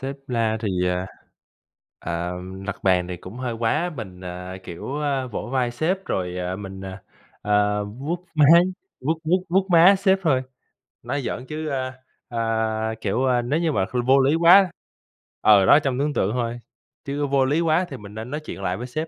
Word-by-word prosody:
Sếp 135 +1 -4
la 115 -3 0
thì, 110 - -2 0.2
à, 90 +1 -1 0.9
ờ, 85 +1 -3 0.3
đập 100 - -3
bàn 90 -2 +3
thì 90 -1 -5
cũng 95 +6 -10
hơi 125 -2 -3
quá, 120 +10 0
mình, 95 -6 -8
à, 90 +1 -7
kiểu, 90 +11 -6
ơ, 140 -3 -1
vỗ 105 -1 -5
vai 125 -2 +1
sếp 180 +9 -1
rồi, 90 -1 -2
ờ, 90 0 -3
mình, 95 -1 -8
ờ, 95 0 -7 0.4
ờ, 105 0 +1
vuốt 145 +12 -5
má, 150 -2 +6 0.6
vuốt 160 +4 -1
vuốt 180 +4 +1
vuốt 190 +2 +2
má 175 +3 +7
sếp 190 0 +3
thôi. 135 -7 +2 0.6
Nói 145 - -2
giỡn 125 0 -4
chứ, 155 +3 -5
ơ, 130 -2 -2 0.4
ờ, 110 -1 -1
kiểu, 100 +1 -1
wo, 125 -2 +1
nếu 150 +4 +2
như 165 -2 +1
mà 100 -9 +1
kh 125 - -13
vô 135 +1 +6
lý 135 +3 +3
quá 175 +3 +6 0.7
ừ, 100 -3 +6
đó, 145 - +7
trong 135 -3 -2
tưởng 145 +1 0
tượng 95 - 0
thôi, 120 -1 -2 0.5
chứ 145 +1 -2
vô 135 -1 +2
lý 145 +5 +1
quá 165 +2 +2
thì 135 - -7
mình 105 -2 -11
nên 110 +2 -6
nói 150 - -2
chuyện 155 -10 -8
lại 90 -1 -1
với 125 +2 -6
sếp. 155 +6 -3
125 Hz, 200 wpm, -23 LUFS, 105-150 Hz, 0.9 s, má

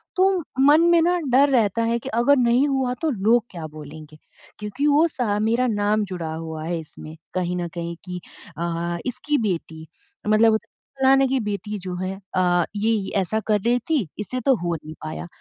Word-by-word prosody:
तो 375 +1 +4 0.3
मन 295 +4 +6
में 340 - +6
न 355 0 +2
डर 275 +3 +5
रहता 230 -3 +2
है 230 +1 +1
कि - - -7
अगर 240 +5 +3
नहीं 245 +3 +3
हुआ 265 -2 0
तो 320 - +1
लोग 225 0 +2
क्या 170 -3 -7
बोलेंगे? 155 0 -11 0.4
क्योंकि 210 +8 -2
वो 300 +3 +5
सा 230 -9 -1
मेरा 230 +4 +1
नाम 210 0 +1
जुड़ा 170 -4 -5
हुआ 160 -1 -6
है 170 0 -2
इसमें 155 0 -10 0.2
कहीं 180 -1 -1
न 175 -1 -2
कहीं 170 0 -4
कि 180 0 -5 0.4
अ, 170 0 -2
इसकी 255 +4 -1
बेटी 160 -2 -5 0.4
मतलब 220 +1 +5 0.4
फलाने 270 0 +5
की 265 0 +1
बेटी 210 +1 -3
जो 180 -1 -5
है 190 +1 -4 0.2
अ, 175 -1 +3
ये 210 -1 0
ऐसा 205 +4 0
कर 210 -1 +3
रही 240 +2 +2
थी, 275 - -1
इससे 255 +5 -3
तो 270 - +4
हो 175 -1 -2
नहीं 155 0 -9
पाया। 155 +2 -5
210 Hz, 185 wpm, -23 LUFS, 175-255 Hz, 0.4 s, मन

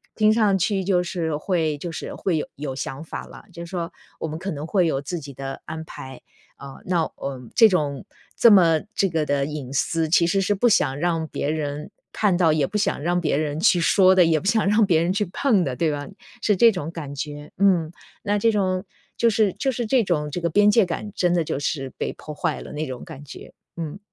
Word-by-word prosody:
听 215 0 +4
上 215 -3 +3
去 190 +1 0
就 180 -2 +2
是 170 -3 -2
会 155 -1 -1
就 170 +4 -6
是 160 - -6
会 175 -4 -1
有 - - -3
有 140 -1 -5
想 135 +2 -5
法 165 - -7
了， - - -13
就 170 0 -8
说 170 -1 -4 0.3
我 160 - -4
们 155 +1 -5
可 190 - -5
能 150 0 -5
会 180 0 +2
有 135 -4 -1
自 170 +5 -4
己 140 -2 -10
的 135 +1 -7
安 160 0 -6
排， 130 -4 -10 0.3
啊 140 -1 -10
那， 175 -2 +1
呃 135 -2 -5
这 225 - +7
种 150 -8 -1 0.3
这 235 - +7
么 170 -6 +6 0.2
这 195 - +2
个 160 -2 0
的 140 -1 0
隐 145 -3 -6
私， 160 +3 0
其 170 +2 +4
实 180 +4 +1
是 200 +2 +1
不 240 +5 +3
想 135 -10 +2
让 165 -1 0
别 145 - -3
人 150 -1 -3 0.2
看 200 -5 +1
到， 165 -3 +4
也 150 -3 +1
不 210 - -2
想 200 - 0
让 175 +3 +1
别 150 -4 +1
人 150 0 -2
去 175 +1 +4
说 185 +2 +5
的、 185 - +6
也 160 -1 +2
不 - - -12
想 205 0 +2
让 210 +2 +4
别 165 -5 +3
人 170 +2 +1
去 205 +1 0
碰 230 -10 +2
的， 135 -5 -3
对 155 +5 +1
吧？ 145 -1 -4 0.4
是 210 - +3
这 230 +4 +6
种 165 -5 -5
感 150 -5 -7
觉， 145 +1 -6
嗯， 180 -5 +3 0.3
那 205 0 0
这 225 +3 +3
种 190 -2 0 0.3
就 235 - +4
是 210 -2 +2
就 270 - -1
是 240 -1 -3
这 250 +1 +3
种 150 -6 -1
这 175 +5 -4
个 170 - 0
边 205 +4 +5
界 210 0 +4
感， 195 +4 -5
真 175 -1 +2
的 170 -2 +2
就 150 - -3
是 140 -2 -2
被 - - -3
破 150 - -9
坏 - - -2
了 - - -9
那 150 +1 -3
种 130 -3 -7
感 140 +2 -10
觉， - - -11 0.3
嗯。 165 +2 -5
165 Hz, 255 characters per minute, -23 LUFS, 150-195 Hz, 0.4 s, 这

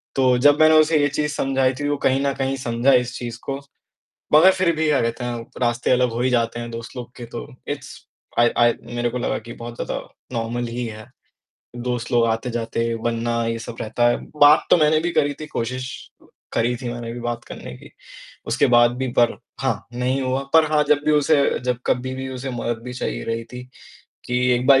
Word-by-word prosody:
तो 130 -2 +3
जब 145 0 +6
मैंने 155 0 +6
उसे 155 +1 +4
यह 145 - +3
चीज़ 150 0 0
समझाई 135 -2 +1
थी 145 - -1
वो 145 - 0
कहीं 135 +1 +3
न 140 - +1
कहीं 135 0 -1
समझा 125 +1 +2
इस 125 -1 +2
चीज़ 120 -1 -6
को, 135 0 -3 0.8
मगर 165 +5 +8
फिर 185 -3 +1
भी 160 0 +1
क्या 150 -2 +3
कहते 115 +2 -2
हैं 120 -1 -4 0.2
रास्ते 120 0 +1
अलग 125 -1 +3
हो 115 - -3
ही 130 +1 +2
जाते 120 -1 0
हैं 120 0 -6
दोस्त 115 +2 -8
लोग 120 -1 -7
के 120 - -8
तो 120 - -5 0.2
इट्स 140 -1 -5 0.5
आइ 120 0 +5
आइ 120 0 +5
मेरे 120 0 -2
को 125 - -3
लगा 120 - -1
कि - - -6
बहुत 120 0 -6
ज़्यादा - - -3 0.3
नॉर्मल 120 +1 -2
ही 125 - -2
है। 110 -1 -8 0.7
दोस्त 120 -1 -3
लोग 120 -1 +4
आते-जाते 115 0 -2 0.2
बनना 115 0 0
ये 115 0 -1
सब 115 0 -8
रहता 120 +2 +1
है। 120 - +2 0.3
बात 150 +2 +7
तो - - +8
मैंने 155 -1 +4
भी 175 +2 -1
करी 145 -2 +1
थी 155 - -5
कोशिश 130 -2 -3 0.7
करी 120 +1 +1
थी 125 0 -6
मैंने 120 -1 -6
भी 120 - -7
बात 120 0 -4
करने - - -9
की, - - -15 0.6
उसके - - +2
बाद 120 0 +6
भी 130 0 -2
पर 120 -1 +4 0.2
हाँ, - - -1
नहीं 125 +2 -1
हुआ, 130 +1 -1
पर 160 -1 +7
हाँ 150 -1 +4
जब 150 -1 +4
भी 155 - +3
उसे 150 +1 +4 0.3
जब 125 -1 0
कभी 130 +1 0
भी 130 0 -5
उसे 135 +1 -4
मदद 120 -2 -3
भी 125 - -6
चाहिए - - -4
रही 115 0 -3
थी 125 0 -7 0.6
कि 125 0 -1 0.2
एक 125 +1 -1
बार 135 -1 +7
125 Hz, 220 wpm, -22 LUFS, 120-135 Hz, 0.8 s, मगर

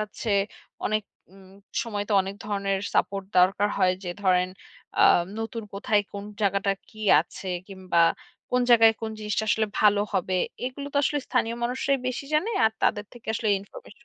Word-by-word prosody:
যাচ্ছে 215 +1 -4 0.6
অনেক 215 0 0 0.3
উম 190 -1 -17 0.3
সময় 210 -3 -3
তো - - -1
অনেক 195 +1 -6
ধরনের 200 -2 -1 0.2
সাপোর্ট 195 -1 +1
দরকার 195 +3 +4
হয় 185 0 +3
যে 175 - -3
ধরেন 185 -1 +3 0.5
আ - - +7 0.4
নতুন 225 +1 -4
কোথায় 205 +1 +1
কোন 200 0 -6 0.2
জায়গাটা 200 -1 +2 0.2
কি 215 -3 -14 0.2
আছে? 175 +3 -8 0.2
কিংবা 185 -3 +1 0.5
কোন 250 - +2
জায়গায় 225 -1 +7
কোন 225 -1 -3
জিনিসটা 210 0 -1
আসলে 220 +1 +2
ভালো 205 -1 +5
হবে? 185 +1 0 0.3
এগুলো 260 +3 -5
তো - - -3
আসলে 290 +1 +1
স্থানীয় 230 +1 0
মানুষরাই 260 +3 0
বেশি 255 +2 -4
জানে 360 +9 +2
আর 220 - +3
তাদের 205 - +2
থেকে 240 -2 -15
আসলে 220 0 -1
ইনফরমেশন 475 - -14
210 Hz, 165 wpm, -26 LUFS, 195-230 Hz, 0.6 s, আ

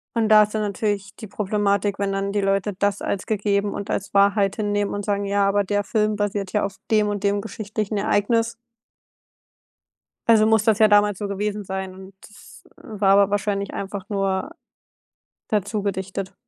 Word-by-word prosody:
Und 225 -1 +1
da 215 -1 +8
ist 210 +1 -4
dann 215 - 0
natürlich 200 -1 -2
die 220 - -9
Problematik, 200 0 0
wenn 200 -1 0
dann 195 0 -2
die 205 0 0
Leute 195 +1 0
das 200 -1 0
als 195 - -3
gegeben 205 -1 0
und 200 +1 -6
als 200 - -3
Wahrheit 200 0 +3
hinnehmen 205 -1 -1
und 205 -1 -4
sagen: 200 -1 -1
„Ja, 200 0 +1
aber 205 +1 +2
der 205 +1 -1
Film 215 0 0
basiert 205 -2 -2
ja 210 - +1
auf 195 -1 -6
dem 215 -1 +3
und 205 -1 -3
dem 200 0 +1
geschichtlichen 215 -1 -4
Ereignis.“ 230 +3 +1 1.7
Also 220 -2 +6
muss 220 -1 +3
das 220 -1 +3
ja 215 -1 +6
damals 205 -1 +4
so 205 -1 -4
gewesen 205 +1 -3
sein, 190 -1 -5
und 190 +1 -12
das 210 - -16
war 200 -3 -1
aber 200 -1 +4
wahrscheinlich 200 -1 -1
einfach 195 0 -6
nur 195 +5 -1 1.0
dazugedichtet. 195 -2 -3
205 Hz, 175 wpm, -22 LUFS, 195-210 Hz, 1.7 s, da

